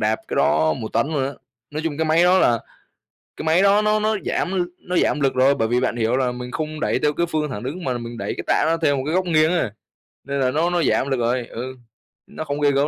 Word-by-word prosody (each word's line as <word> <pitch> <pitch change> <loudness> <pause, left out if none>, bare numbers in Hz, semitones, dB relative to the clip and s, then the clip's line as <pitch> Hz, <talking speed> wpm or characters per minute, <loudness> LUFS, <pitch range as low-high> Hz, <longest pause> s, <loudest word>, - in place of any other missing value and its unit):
đạp 110 +1 +1
cái - - -3
đó 80 +1 +3
1 110 - -5
tấn - - +2
luôn 145 -4 -1
á. 140 - -3 0.4
Nói 155 +2 -4
chung 155 -2 -2
cái 160 - +1
máy 160 +2 +4
đó 185 +1 +5
là 120 -8 +3 0.8
cái - - -6
máy 165 +4 +4
đó 200 +1 +4
nó 215 0 +2
nó 215 0 +1
giảm 185 - -1
l 185 - +2 0.2
nó 180 0 -4
giảm 150 - +2
lực 135 -2 +1
rồi, 130 +2 +4
bởi 115 -5 0
vì 120 +2 +1
bạn 125 -2 -1
hiểu 115 +2 +1
là 130 -2 0
mình 125 0 -7
không 155 +3 -4
đẩy - - +1
theo 150 - +1
cái 170 +3 0
phương 155 -3 -2
thẳng 105 -5 -5
đứng 155 +8 -5
mà 125 -2 -1
mình 120 0 -7
đẩy - - -3
cái - - -5
tạ - - +2
nó 165 - +2
theo 145 -3 +3
một 130 - -2
cái 155 - -1
góc 185 0 +2
nghiêng 155 -2 +3
ấy, 130 -11 0 0.5
nên 140 +1 -3
là 130 -1 +2
nó 165 +5 +1
nó 175 -1 +1
giảm 135 - +1
lực 135 - 0
rồi, 120 +1 0
ừ, 130 +2 -6 0.5
nó - - -6
không 145 -1 -4
ghê 145 - +4
gớm 140 +1 +2
145 Hz, 285 wpm, -22 LUFS, 125-165 Hz, 0.8 s, đó